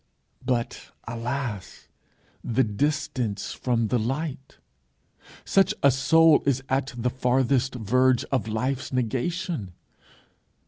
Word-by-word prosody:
But 120 -2 -2 0.2
alas, 120 -3 -5 0.6
the 120 +3 +1
distance 115 -2 -2
from 115 -3 0
the 125 - +1
light! 135 +3 -4 0.9
Such 195 0 +3
a 140 - +7
soul 160 +4 +5
is 135 -1 +1
at 135 -1 -1
the 125 +1 0
farthest 130 +1 +1
verge 125 +2 +2
of 130 -5 0
life's 125 +5 -2
negation! 130 - -2
130 Hz, 100 wpm, -25 LUFS, 115-135 Hz, 0.9 s, a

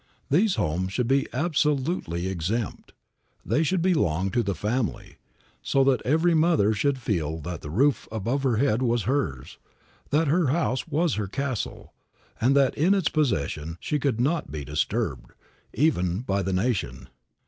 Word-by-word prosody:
These 185 +7 +3
homes 90 +5 -1
should 125 +1 0
be 135 +2 +2
absolutely 145 - 0
exempt; 95 +5 -3 0.5
they 155 - +1
should 170 +2 +1
belong 95 - +1
to 120 - +2
the 100 -4 -2
family, 110 - -3 0.4
so 135 - +2
that 135 -1 +2
every 160 +5 +2
mother 160 -10 +3
should 135 +7 0
feel 80 - -2
that 85 +1 -6
the 75 - -7
roof 135 - +1
above 115 +6 -1
her 130 -5 +1
head 125 -2 +2
was 120 -3 +1
hers; 90 - -2 0.5
that 155 +2 +2
her 165 +2 +2
house 130 -2 0
was 160 +1 +1
her 100 - -3
castle, 130 +2 -4 0.5
and 130 +4 +3
that 135 -2 +4
in 180 +7 +3
its 190 -5 +1
possession 85 - -1
she 150 - -1
could 130 -5 0
not 150 +6 0
be 75 -2 -5
disturbed, 75 +2 -2 0.4
even 95 - +1
by 100 -5 -1
the 95 0 -2
nation. 90 - -1
125 Hz, 160 wpm, -25 LUFS, 95-150 Hz, 0.5 s, that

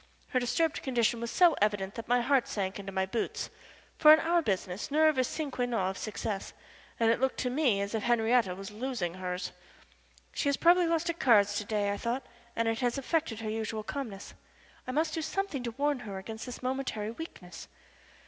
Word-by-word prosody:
Her 255 - +2
disturbed 310 +6 0
condition 235 -3 +1
was 235 - -3
so 345 +5 +5
evident 205 -2 +1
that 230 - -7
my 245 +1 +3
heart 265 +1 +2
sank 195 -1 -3
into 195 0 -6
my 190 0 0
boots, 220 +4 -3 0.5
for 305 - +9
in 310 - +8
our 340 +1 +2
business 190 - -2
nerve 310 -1 +4
is 255 - +2
a - - -7
sine 305 -3 -3
qua 250 -1 -1
non 225 -6 0
of - - -9
success, 210 -2 -4 0.5
and 225 -1 +4
it 230 - +1
looked 265 0 0
to 250 - -1
me 255 -7 +2
as 200 +2 -3
if 220 - 0
Henriette 230 -4 +2
was 195 +1 -7
losing 215 -6 -3
hers. 180 0 -4 0.8
She 285 - 0
has 280 - +1
probably 345 +1 +5
lost 335 0 +1
at 335 - -12
cards 205 -5 +5
to 210 - -5
day, 205 -1 0
I 200 - -2
thought, 240 +4 -2 0.3
and 230 0 0
it 225 0 0
has 245 +1 0
affected 275 -5 -1
her 220 - -3
usual 220 0 -3
calmness. 220 -6 -6 0.5
I - - -2
must 310 +3 0
do 325 - -1
something 320 -3 -2
to 240 -1 -3
warn 290 -1 +1
her 200 -5 -6
against 220 +5 -7
this 250 0 -8
momentary 255 -5 -2
weakness. 195 - -9
235 Hz, 210 wpm, -30 LUFS, 205-280 Hz, 0.8 s, for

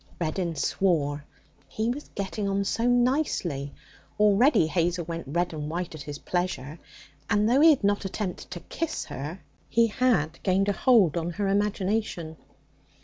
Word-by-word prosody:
Reddin 170 0 -2
swore. 150 -3 0 0.4
He 220 +2 -1
was 290 +4 -7
getting 200 +1 -2
on 195 0 0
so 230 +4 0
nicely. 245 - +1 0.5
Already 210 - +5
Hazel 170 +1 0
went 165 -3 -5
red 170 +4 -1
and 150 -1 -4
white 175 +1 -4
at 155 - -8
his 145 0 -6
pleasure, 170 -4 -3 0.5
and 210 -1 +3
though 255 +5 +4
he 325 - +8
had 290 -8 +3
not 205 0 +2
attempted 195 -1 -4
to 175 -1 -7
kiss 330 -1 -4
her, 150 +8 -6 0.3
he 230 0 +4
had 215 -9 +1
gained 195 +1 +2
a - - +2
hold 200 - +4
on 170 0 -1
her 200 +2 -1
imagination. 195 -4 -1
185 Hz, 155 wpm, -26 LUFS, 165-215 Hz, 0.5 s, he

